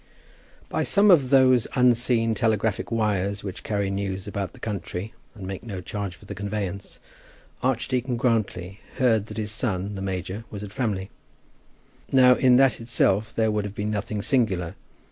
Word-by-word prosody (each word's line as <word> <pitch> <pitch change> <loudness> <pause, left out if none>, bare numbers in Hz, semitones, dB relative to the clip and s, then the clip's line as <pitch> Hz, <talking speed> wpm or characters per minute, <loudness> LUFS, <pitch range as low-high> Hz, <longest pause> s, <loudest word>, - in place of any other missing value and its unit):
By - - -1
some 205 0 +4
of 140 -8 +5
those 130 -3 +5
unseen 120 -2 +3
telegraphic 110 -4 0
wires 100 -3 0
which 95 -3 -6
carry 100 -2 -1
news 95 -1 -3
about 100 -2 -4
the - - -15
country 100 -1 -5 0.2
and 100 -4 -8
make 95 0 -5
no 100 -5 -6
charge 100 0 -5
for - - -18
the - - -6
conveyance, 100 -2 -4 0.6
Archdeacon 125 0 0
Grantly 105 -6 -1 0.2
heard 110 -5 +2
that - - -9
his 105 -1 -2
son 100 -2 -2
the 95 - -6
major 95 +2 -4
was 105 -1 -7
at 100 - -7
Framley. 100 -6 -2 1.0
Now 130 -1 +7
in 125 0 +4
that 130 -2 +4
itself 110 -3 +1
there 110 -1 +2
would 105 -1 0
have 105 0 -6
been 105 +1 -2
nothing 105 0 -3
singular. 95 -10 +1
105 Hz, 165 wpm, -25 LUFS, 100-120 Hz, 1.0 s, Now